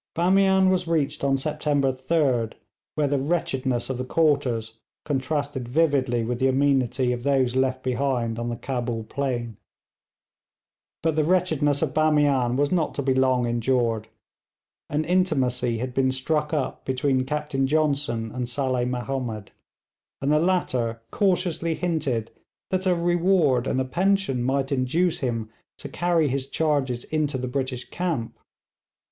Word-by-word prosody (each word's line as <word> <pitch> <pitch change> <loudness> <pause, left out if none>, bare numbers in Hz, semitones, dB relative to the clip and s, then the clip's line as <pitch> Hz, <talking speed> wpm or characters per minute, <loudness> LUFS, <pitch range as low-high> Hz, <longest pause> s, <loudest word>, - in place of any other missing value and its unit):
Bamian 190 +2 +4
was 180 -2 0
reached 150 -4 0
on 135 -1 +2
September 145 -1 0
3d, 130 -4 0 0.4
where 150 -2 +1
the 140 0 +1
wretchedness 135 -5 -1
of 130 -2 -3
the - - -1
quarters 130 -7 0 0.3
contrasted 140 -2 -2
vividly 135 -5 +2
with 120 +1 -2
the 130 - +3
amenity 130 -2 +2
of 120 - -4
those 130 -2 +1
left 130 0 0
behind 125 -3 -1
on 120 0 -2
the 120 - -2
Cabul 120 -3 -3
plain. 120 -3 -3 1.5
But 160 -2 +1
the 155 - +2
wretchedness 155 -4 +1
of 140 -5 -1
Bamian 145 -5 +3
was 145 +2 +1
not 175 -4 0
to 140 - -2
be 135 0 +2
long 130 -1 +2
endured. 120 -2 0 0.8
An 150 +2 -1
intimacy 130 -9 +1
had 125 +2 -4
been 130 0 +2
struck 150 +3 -1
up 150 -4 -2
between 130 0 0
Captain 150 -1 -1
Johnson 140 -7 0
and 125 0 -4
Saleh 130 -1 0
Mahomed, 125 -4 -4 0.7
and 140 +2 0
the 150 - +4
latter 130 -10 0
cautiously 180 -4 +1
hinted 155 -11 -1 0.4
that 190 0 0
a 180 - +3
reward 170 -6 +2
and 130 - 0
a 130 - 0
pension 190 -2 +1
might 135 +2 0
induce 150 +7 +1
him 115 -4 -3 0.3
to - - -8
carry 170 +2 +1
his 135 0 -2
charges 140 -5 0
into 150 -3 -1
the 125 0 -3
British 130 -1 -3
camp. 165 -11 -2
135 Hz, 145 wpm, -24 LUFS, 125-155 Hz, 1.5 s, Bamian